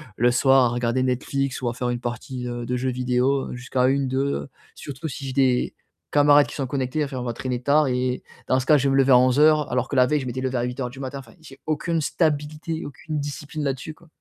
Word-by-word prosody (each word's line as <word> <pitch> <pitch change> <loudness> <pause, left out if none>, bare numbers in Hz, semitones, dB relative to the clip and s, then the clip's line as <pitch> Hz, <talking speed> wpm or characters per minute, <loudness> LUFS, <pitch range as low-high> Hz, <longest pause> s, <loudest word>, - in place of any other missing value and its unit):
le 120 +3 +3
soir, 135 +1 +5
à - - +2
regarder 120 +1 0
Netflix 130 +1 -1
ou 125 - -2
à 120 - -1
faire 125 +1 -2
une 120 0 -2
partie, 125 +1 -5
heu, 120 -1 -4
de 125 +1 -1
jeux 130 +1 -1
vidéo, 125 +2 0
heu, - - -5
jusqu'à 125 0 0
01:00, 135 0 +1
02:00, 135 +3 -1 0.3
surtout 145 +2 -7
si 135 0 -7
j'ai 130 - -4
des 130 -2 +2 0.4
camarades 145 0 +5
qui - - -9
sont 135 -3 -2
connectés. 135 +3 -1
Enfin, 140 -2 -5
on - - -4
va 120 -1 -3
traîner 125 0 -3
tard 145 +2 +3
et 125 0 -1 0.2
dans 130 - +3
ce 130 - -4
cas 150 - +6
je 140 0 +1
vais - - +2
me - - +3
lever 135 0 +4
à 125 - +9
11:00 150 +4 +4
alors 125 +1 0
que - - -3
la 125 - +6
veille 150 +2 0
je - - -6
m'étais 125 +1 -4
levé 130 -1 -1
à 120 - 0
08:00 125 +1 -3
du 130 +2 -12
matin, 135 +1 -5
enfin 115 -4 -14
j'ai 160 - -14
aucune 160 +2 -1
stabilité, 155 +1 -1
aucune 150 +2 -5
discipline 145 +1 -5
là-dessus 135 +2 -3
quoi. 170 +2 -22
130 Hz, 255 wpm, -23 LUFS, 125-145 Hz, 0.4 s, à